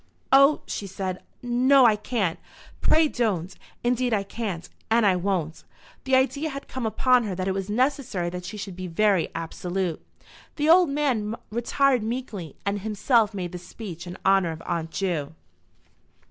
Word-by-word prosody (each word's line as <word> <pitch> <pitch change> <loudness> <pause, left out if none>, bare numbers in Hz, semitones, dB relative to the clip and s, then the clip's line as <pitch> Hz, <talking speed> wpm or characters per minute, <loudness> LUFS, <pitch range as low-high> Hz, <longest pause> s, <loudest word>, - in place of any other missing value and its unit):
"Oh," 275 +2 +6
she 200 - -5
said; 190 -1 -4 0.2
"no, 255 +2 +5
I 220 -3 +6
can't. 210 -5 -2 0.4
Pray 315 0 +4
don't. 195 - -1 0.3
Indeed 245 -1 +1
I 200 - 0
can't, 195 -5 -5 0.2
and 225 0 +4
I 190 -2 +4
won't." 175 -4 -2 0.4
The 265 0 +3
idea 275 +4 +1
had 275 -1 -7
come 255 -3 -3
upon 250 +2 +3
her 195 -3 -3
that 185 +1 -3
it 190 - +1
was 195 +1 -4
necessary 245 -6 0
that 180 0 -6
she 210 +4 -7
should 195 -3 -6
be 185 0 -5
very 190 0 +2
absolute. 175 +1 -3 0.5
The 295 0 0
old 355 -1 +7
man 255 -7 0 0.2
retired 250 +3 +2
meekly, 215 - -5
and 200 0 0
himself 220 +1 +1
made 180 -3 -4
the 180 - -6
speech 180 -1 -9
in 175 - -7
honour 195 -3 +4
of 160 0 -7
Aunt 165 -1 -2
Ju. 165 -5 -2
210 Hz, 165 wpm, -25 LUFS, 180-250 Hz, 0.5 s, old